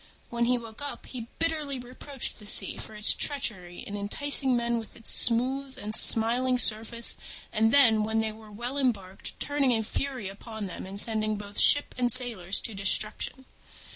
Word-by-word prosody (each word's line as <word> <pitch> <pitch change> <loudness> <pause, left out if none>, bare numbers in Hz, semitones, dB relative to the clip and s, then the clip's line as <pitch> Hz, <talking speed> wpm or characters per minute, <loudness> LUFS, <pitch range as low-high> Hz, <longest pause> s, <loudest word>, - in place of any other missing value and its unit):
When 235 0 -1
he 250 +1 0
woke 230 +1 -11
up, 285 - -7
he 235 -3 -9
bitterly 310 -4 -3
reproached 255 +2 -6
the 210 - -10
Sea 195 - +3
for 220 - -10
its 210 0 +4
treachery 200 -12 -5
in 205 -4 -9
enticing 260 +6 +4
men 235 0 -2
with 225 - -12
its 225 - -1
smooth 260 +3 +4
and 210 +1 -8
smiling 245 +4 +3
surface, 230 0 +1 0.4
and 225 0 +1
then, 230 -6 +3
when 220 +1 -2
they 220 0 -3
were 215 0 -16
well 240 +6 -6
embarked, 195 -8 -1
turning 285 -2 -1
in 225 -2 -1
fury 255 -1 -5
upon 215 +2 -9
them 185 0 -9
and 195 +1 -2
sending 215 -1 0
both 205 0 -8
ship 290 - +3
and 245 -1 +1
sailors 220 -7 +4
to 225 - -6
destruction. 210 +6 -3
230 Hz, 175 wpm, -26 LUFS, 215-255 Hz, 0.4 s, its